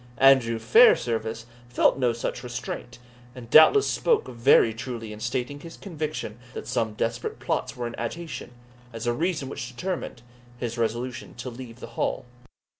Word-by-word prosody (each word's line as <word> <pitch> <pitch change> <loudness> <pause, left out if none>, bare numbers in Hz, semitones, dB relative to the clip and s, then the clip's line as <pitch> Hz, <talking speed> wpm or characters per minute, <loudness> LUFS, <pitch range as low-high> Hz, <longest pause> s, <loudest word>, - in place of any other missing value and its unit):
Andrew 130 -4 +5
Fairservice 115 - +4 0.2
felt 125 - +3
no 125 -2 +3
such 115 +1 -4
restraint, 125 0 -6 0.4
and 120 -2 -11
doubtless 160 - +8
spoke 470 -3 +1
very 115 -2 +4
truly 115 -2 -6
in 105 - -10
stating 125 +4 -3
his 165 +2 -11
conviction 155 - -5 0.2
that - - -5
some 115 -3 -1
desperate 115 +2 -2
plots - - -2
were 120 - -3
in 120 - -4
agitation, 160 +7 -5 0.4
as 115 0 -5
a 120 - +2
reason 160 0 -1
which 125 -2 -5
determined 155 +2 -5 0.3
his 120 -2 -4
resolution 120 +2 -3
to 120 +1 -6
leave 120 -1 -10
the - - -5 0.2
Hall. - - -1
120 Hz, 155 wpm, -26 LUFS, 115-135 Hz, 0.4 s, doubtless